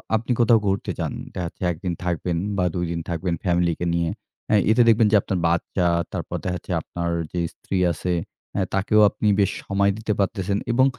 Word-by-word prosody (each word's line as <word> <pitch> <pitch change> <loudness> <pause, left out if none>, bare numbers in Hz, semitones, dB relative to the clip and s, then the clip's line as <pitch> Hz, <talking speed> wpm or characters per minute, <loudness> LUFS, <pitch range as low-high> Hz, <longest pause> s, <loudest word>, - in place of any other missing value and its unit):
আপনি 115 +3 -1
কোথাও 115 -1 +5
ঘুরতে 95 0 0
যান। - - -2 0.2
দেখাচ্ছে 85 -2 -5
১ 85 - -6
দিন 90 -2 -1
থাকবেন 85 0 -1 0.2
বা 90 - +2
২ 90 -1 0
দিন 85 - -2
থাকবেন 85 +1 -1
ফ্যামিলিকে 85 -1 +1
নিয়ে। 85 -1 +1 0.4
অ্যাঁ 105 -2 +4
এতে 120 +2 +5
দেখবেন 115 -1 +5
যে, - - +5
আপনার 95 -2 -2
বাচ্চা 85 +2 0 0.3
তারপর - - -3
দেখাচ্ছে 90 -2 -3
আপনার 85 0 -4 0.2
যে, 90 - -2
স্ত্রী 95 - -4
আছে 90 +2 -2 0.4
অ্যা 100 - 0
তাকেও 100 +2 +3
আপনি 105 - -2
বেশ 100 - +3
সময় 100 0 +2
দিতে 110 -1 -1
পারতেছেন 100 0 0
এবং 130 +3 +4
95 Hz, 185 wpm, -23 LUFS, 85-105 Hz, 0.4 s, কোথাও